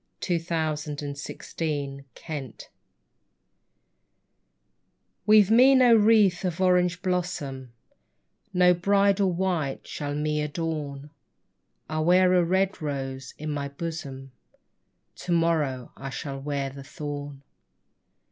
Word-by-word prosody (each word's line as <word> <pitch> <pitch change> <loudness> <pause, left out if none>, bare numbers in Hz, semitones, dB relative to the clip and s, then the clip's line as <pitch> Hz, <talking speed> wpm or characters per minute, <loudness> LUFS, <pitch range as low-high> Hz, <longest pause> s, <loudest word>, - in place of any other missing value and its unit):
20 175 -3 0
FLOWER 165 -1 -1
OF 150 0 -7
YOUTH 145 -1 -7
THE 140 -4 -2 0.2
BRIDE 145 -7 -6 2.6
WEAVE 210 -1 +6
me 255 +4 +7
no 250 -2 +6
wreath 210 -4 +4
of 180 -2 -2
orange 180 -1 +2
blossom, 155 -9 -3 0.8
No 180 -1 +5
bridal 195 +1 +2
white 170 -6 -2
shall 145 -1 -4
me 150 0 -1
adorn; 150 -2 -4 0.8
I 155 0 -3
wear 180 +3 +4
a 180 -1 +4
red 190 +2 0
rose 135 -3 -5
in 155 0 -4
my 145 -1 -3
bosom; 140 -3 -6 0.9
To 180 - -5
morrow 155 -7 0
I 135 - -7
shall 135 +1 -5
wear 140 -1 -3
the 140 0 -10
thorn. 145 0 -7
155 Hz, 110 wpm, -26 LUFS, 140-180 Hz, 2.6 s, me